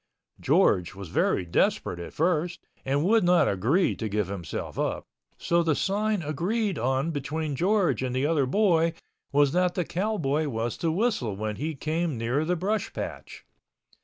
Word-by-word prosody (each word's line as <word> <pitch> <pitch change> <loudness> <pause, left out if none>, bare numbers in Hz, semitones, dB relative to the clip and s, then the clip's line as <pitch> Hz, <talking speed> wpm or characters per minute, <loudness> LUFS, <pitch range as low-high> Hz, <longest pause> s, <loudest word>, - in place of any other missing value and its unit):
George 90 0 +2
was 95 -3 -8
very 90 - +1
desperate 85 +1 0
at 85 - -7
first 175 +1 0 0.2
and 140 +3 0
would 220 +2 +4
not 175 0 +4
agree 120 - +2
to 110 - -3
give 105 -2 -1
himself 90 -6 -5
up—so 170 0 -2
the 160 -3 +1
sign 205 +1 0
agreed 190 - -1
on 130 +6 0
between 150 0 -3
George 190 +1 +2
and 130 -1 -2
the 130 +2 +1
other 150 -4 +2
boy 170 -1 +3 0.4
was 145 0 +4
that 180 +1 +1
the 180 - 0
cowboy 160 -7 -1
was 115 -2 -2
to 165 - 0
whistle 175 - 0
When 105 +1 -3
he 155 +2 -3
came 155 0 -2
near 120 +6 0
the 180 +2 +1
brush 205 +5 -1
patch. - - -7
155 Hz, 160 wpm, -27 LUFS, 125-180 Hz, 0.4 s, would